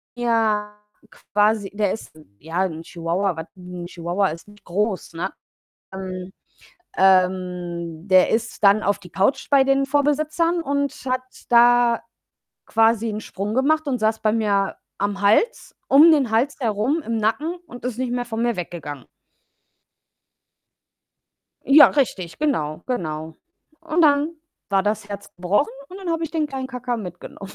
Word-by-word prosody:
ja, 220 -3 0 0.4
quasi, 210 -1 0
der 205 -2 0
ist, 225 - -8 0.3
ja, 165 +5 -3
'n 165 -2 -5
Chihuahua, 175 +3 -2
was 160 - -6
'n 180 -1 -8
Chihuahua 175 +3 -1
ist 165 +5 -8
nicht 205 0 -18
groß, 195 -1 -2
ne? 180 +4 -3 0.6
Ähm 185 -1 -6 0.7
ähm, 180 -2 +1
der 185 -1 +5
ist 225 -1 -2
dann 200 +2 +6
auf 200 0 +1
die 180 -3 -14
Couch 200 +8 +1
bei 275 -1 +6
den 275 0 +2
Vorbesitzern 305 +4 +1
und 280 -1 -1
hat 255 0 0 0.3
da 240 0 +5 0.6
quasi 225 0 +2
'n 215 0 -4
Sprung 205 +2 -5
gemacht 310 +3 +2
und 250 -4 -1
saß 220 0 +1
bei 215 -1 +2
mir 205 -3 +1 0.2
am 200 0 -2
Hals 225 - +2
um 300 +5 +7
den 275 -7 +2
Hals 250 +6 +1
herum 235 +7 0
im 230 - -2
Nacken 270 +11 0
und 245 -4 -10
ist 250 -2 -3
nicht 255 -1 -2
mehr 245 0 -2
von 225 -1 -4
mir 240 -1 +1
weggegangen. 150 -5 -6 2.6
Ja, 290 +1 +8
richtig, 195 - -1
genau, 165 - -1
genau. 160 -9 -4 0.4
Und 330 +1 -1
dann 295 +2 +3 0.4
war 195 -1 +3
das 210 0 -2
Herz 200 0 -8
gebrochen 185 +11 0 0.2
und 375 - -10
dann 365 -3 -4
habe 330 0 -1
ich 305 - -6
den 315 -2 0
kleinen 265 -2 -5
Kacka 250 -2 -4
mitgenommen. 195 0 -9
215 Hz, 150 wpm, -22 LUFS, 185-265 Hz, 2.6 s, Ja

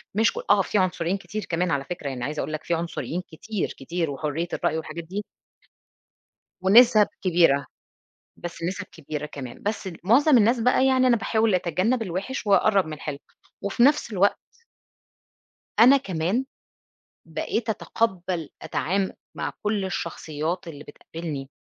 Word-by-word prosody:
مش 225 +1 +3
ك - - -12
آه، 205 -1 +6
فيه 200 +2 0
عُنصريين 180 0 0
كتير 200 +2 -6
كمان 170 0 0
على 140 -1 0
فكرة. 150 -3 -5
يعني 125 -2 -5
عايزة 150 +3 -3
أقول 155 - -3
لك، 155 - -4
فيه 170 - 0
عنصريين 170 +1 -3
كتير، 205 +5 -4
كتير 165 +3 -2
وحرية 155 +4 -2
الرأي 160 - 0
والحاجات 160 +1 -6
دي. 195 +5 -5 1.4
ونِسَب 215 +1 +7 0.2
كبيرة، 165 -6 +4 0.7
بس 170 -1 -8
نِسَب 190 +3 -3
كبيرة 150 -1 -5
كمان، 130 -5 -9
بس 205 -1 -2 0.2
مُعظم 255 +5 +6
الناس 230 +3 +3
بقى، 250 +2 +3
يعني 260 -1 +4
أنا 240 -2 +5
باحاول 220 -2 +1
أتجنَّب 185 +7 +1
الوِحِش 200 +6 -4
وأقرَّب 200 -1 +4
من 155 - -6
الحلو 150 -1 -5 0.4
وفي 200 +4 0
نفس 280 -4 +4
الوقت 200 +1 +3 1.4
أنا 255 +4 +8
كمان، 195 +1 -1 0.8
بقيت 225 0 -3
أتقبَّل 185 -7 -1
أتعام 190 +3 -1 0.2
مع - - -3
كل 210 -2 0
الشخصيّات 170 -1 -3
اللي 145 -3 -8
بتقابلني، 145 -2 -7
185 Hz, 145 wpm, -25 LUFS, 160-215 Hz, 1.4 s, أنا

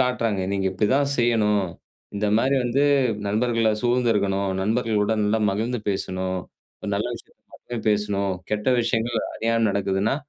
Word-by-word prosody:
காட்டுறாங்க. 115 -5 +1
"நீங்க 95 -1 0
இப்படி 105 +3 +1
தான் 140 0 +1
செய்யணும். 105 -4 +2 0.5
இந்த 105 +1 0
மாரி 135 +4 +2
வந்து 125 +4 +1 0.4
நண்பர்களை 115 +2 +1
சூழ்ந்துருக்கணும். 105 -6 +1
நண்பர்களுடன் 110 -1 +1
நல்லா 110 +2 +1
மகிழ்ந்து 115 +5 -1
பேசணும். 95 -1 -2 0.4
ஒரு - - -5
நல்ல 105 +4 -1
விஷயத்தை 115 - -15
மட்டும் 120 -2 -7
பேசணும், 100 -2 0 0.2
கெட்ட 105 +3 0
விஷயங்கள் 115 0 0 0.2
அறியாம 115 0 +1
நடக்குதுன்னா 100 +3 0
110 Hz, 135 wpm, -24 LUFS, 100-120 Hz, 0.5 s, செய்யணும்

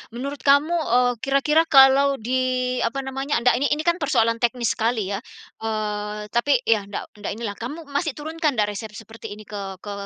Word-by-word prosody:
menurut 280 +3 -5
kamu, 285 +3 +4
eee, 250 -7 +2
kira-kira 300 +5 +2
kalau 275 0 +6
di 255 +1 -1
apa 270 +4 -1
namanya, 270 -2 -2
ndak, 250 0 +4
ini 285 - +2
ini 305 - -4
kan 345 +1 +1
persoalan 230 -6 +1
teknis 240 -2 +1
sekali 220 -3 -1
ya, 200 - -2 0.4
eee, 210 -1 -4
tapi, 255 +1 +2
ya, 210 -3 +1
ndak 200 - -6
ndak 205 - -4
inilah. 220 -3 -5
Kamu 290 +8 -6
masih 285 +1 -1
turunkan 310 -1 -2
ndak 210 -2 +1
resep 210 +1 -7
seperti 225 -1 -9
ini 215 - -12
ke 205 -1 -7 0.2
ke 205 - -6
250 Hz, 185 wpm, -23 LUFS, 220-280 Hz, 0.4 s, kalau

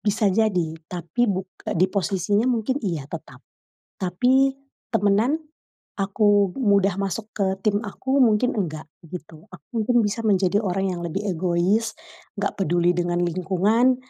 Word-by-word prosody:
bisa 205 -1 +1
jadi 185 -7 +1 0.2
tapi 180 +8 -1
buk 190 -1 -1 0.3
di 180 - +4
posisinya 200 +4 +1
mungkin 250 +3 0
iya 170 - -2
tetap. - - -10 0.5
Tapi 250 +9 +2 0.4
temenan, 210 +9 +2 0.6
aku 205 0 +2
mudah 200 -4 +2
masuk 200 +3 -3
ke 200 - -1 0.2
tim 205 -1 +2
aku 260 +6 -2
mungkin 245 +1 +4
nggak, 165 - -3 0.2
gitu. 160 +1 -10
Aku 185 -6 -14 0.2
mungkin 235 +2 +3
bisa 210 +2 -1
menjadi 200 0 +3
orang 195 -2 -1
yang 175 - -4
lebih 195 +5 -3
egois, 185 +4 0 0.4
nggak 200 0 -1
peduli 175 0 +2
dengan 175 0 0
lingkungan, 195 +8 +2
200 Hz, 135 wpm, -23 LUFS, 180-220 Hz, 0.6 s, di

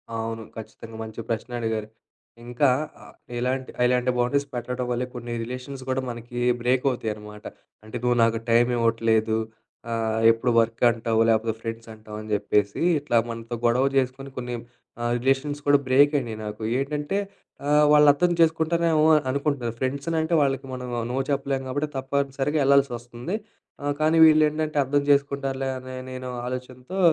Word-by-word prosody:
అవును 115 0 -4
ఖచ్చితంగా 110 0 -9
మంచి 110 0 -9
ప్రశ్నే 115 +2 -3
అడిగారు, 110 -2 -2 0.6
ఇంకా 120 +4 +2 0.7
ఇలాంటి 130 +2 -2
ఇలాంటి 125 0 +2
బౌండరీస్ 140 +4 +1
పెట్టడం 125 +1 -3
వల్లే 125 +1 -1
కొన్ని 120 -1 -5
రిలేషన్స్ 130 +3 -7
కూడా 130 0 0
మనకి 120 +1 -6 0.2
బ్రేక్ 125 +2 +1
అవుతాయి 120 -4 -2
అనమాట. 105 0 -12 0.4
అంటే 110 +3 -6
నువ్వు 125 0 +2
నాకు 115 0 +2
టైమివ్వట్లేదు, 115 -2 +2 0.5
ఆహ్, 110 -1 -1
ఎప్పుడు 115 +2 0
వర్క్ 115 +1 0
అంటావు 115 -1 0
లేపోతే 110 0 +2
ఫ్రెండ్స్ 115 0 -6
అంటావు 110 -1 -10
అని 110 - -10
జెప్పేసి 105 0 +1 0.2
ఇట్లా 140 -5 0
మనతో 115 +1 -5
గొడవ 120 +3 +3
జేసుకొని 135 +1 -1
కొన్ని 125 -1 -4 0.5
ఆహ్, 120 0 0
రిలేషన్స్ 135 +3 0
కూడా 145 0 +6
బ్రేక్ 140 +3 +5
అయినయి 115 -4 -6
నాకు. 105 +1 -6 0.2
ఏంటంటే 150 +6 -2 0.5
ఆహ్, 150 +1 +5
వాళ్ళర్థం 150 +3 +5
చేసుకుంటారేమో 165 -1 +3 0.2
అనుకుంటున్నారు, 140 -3 -1
ఫ్రెండ్స్ 140 +3 -2
అంటే 160 +2 -2
వాళ్ళకి 135 -1 0
మనం 125 -1 -5 0.2
నో - - -2
చెప్పలేం 140 -1 -1
కాబట్టి 145 +4 -1
తప్పనిసరిగా 135 +2 -1
యెళ్ళాల్సొస్తుంది. 135 - +1 0.5
ఆహ్, 145 0 0
కానీ 155 +1 +3
వీళ్ళేంటంటే 155 0 +3
అర్థం 145 +2 +1
చేసుకుంటారులే 140 -1 +1
అని 130 0 -8 0.2
నేను 130 0 -6 0.2
ఆలోచనతో 130 +6 -6
125 Hz, 140 wpm, -25 LUFS, 115-140 Hz, 0.7 s, కూడా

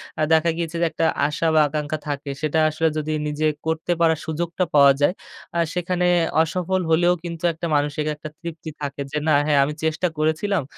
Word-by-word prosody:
অ্যা 155 - -1
দেখা 160 +1 +4
গিয়েছে 170 -1 -3
যে - - +4
একটা 165 - 0 0.2
আশা 150 +2 -1
বা 155 - +6
আকাঙ্ক্ষা 150 +1 -3
থাকে 145 0 -4
সেটা 155 +1 +1
আসলে 160 +1 0
যদি 155 0 -2 0.2
নিজে 150 +1 -1 0.2
করতে 160 +2 -1
পারার 160 -2 +3
সুযোগটা 170 +3 -2
পাওয়া 140 -1 +8
যায় 160 - +4 0.4
আ - - +2
সেখানে 180 0 -1 0.4
অসফল 180 +3 -1
হলেও 175 +2 +4
কিন্তু 170 0 -6
একটা 165 +2 -6
মানসিক 145 +1 0
একটা 150 +1 -8
তৃপ্তি 165 -1 -7
থাকে 140 0 -4
যে 150 - -2
না 155 - +4
হ্যাঁ, 145 -2 +3
আমি 150 +2 -2
চেষ্টা 160 +3 0
করেছিলাম। 160 +4 0
160 Hz, 190 wpm, -22 LUFS, 150-170 Hz, 0.4 s, পাওয়া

